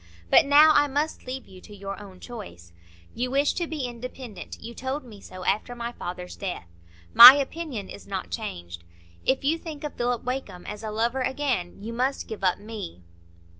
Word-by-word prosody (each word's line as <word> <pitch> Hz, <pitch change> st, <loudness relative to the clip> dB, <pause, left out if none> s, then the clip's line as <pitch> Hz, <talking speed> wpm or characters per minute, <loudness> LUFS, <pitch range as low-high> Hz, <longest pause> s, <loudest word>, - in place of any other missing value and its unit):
But -, -, +7 dB
now 300 Hz, +2 st, +8 dB
I 290 Hz, 0 st, +4 dB
must 290 Hz, 0 st, -2 dB
leave 260 Hz, 0 st, -6 dB
you 185 Hz, -1 st, -14 dB
to 210 Hz, -, -13 dB
your 200 Hz, +1 st, -7 dB
own 190 Hz, -3 st, -12 dB
choice. 90 Hz, -, -10 dB, 0.4 s
You 250 Hz, +1 st, -2 dB
wish 280 Hz, +2 st, +2 dB
to 345 Hz, -, -2 dB
be 305 Hz, -5 st, -3 dB
independent; 245 Hz, -2 st, -8 dB
you 235 Hz, +1 st, -8 dB
told 265 Hz, +4 st, -4 dB
me 215 Hz, -5 st, -13 dB
so 185 Hz, 0 st, -10 dB
after 220 Hz, +5 st, 0 dB
my 235 Hz, 0 st, -4 dB
father's 180 Hz, -5 st, -7 dB
death. 185 Hz, -, -5 dB, 0.5 s
My 265 Hz, -, +13 dB
opinion 280 Hz, -, -4 dB
is 200 Hz, -, -11 dB
not 195 Hz, -2 st, -5 dB
changed. 85 Hz, -, -6 dB, 0.4 s
If 265 Hz, +1 st, +2 dB
you 315 Hz, +4 st, +1 dB
think 310 Hz, -4 st, -8 dB
of 300 Hz, -, -4 dB
Philip 240 Hz, 0 st, -1 dB
Wakem 250 Hz, -8 st, -5 dB
as 210 Hz, 0 st, -7 dB
a 220 Hz, -, -5 dB
lover 230 Hz, +4 st, 0 dB
again, 255 Hz, -9 st, -2 dB
you 230 Hz, +2 st, -5 dB
must 260 Hz, +3 st, -1 dB
give 220 Hz, -3 st, -7 dB
up 185 Hz, -1 st, +3 dB
me." 205 Hz, -, -8 dB
235 Hz, 190 wpm, -26 LUFS, 195-270 Hz, 0.5 s, My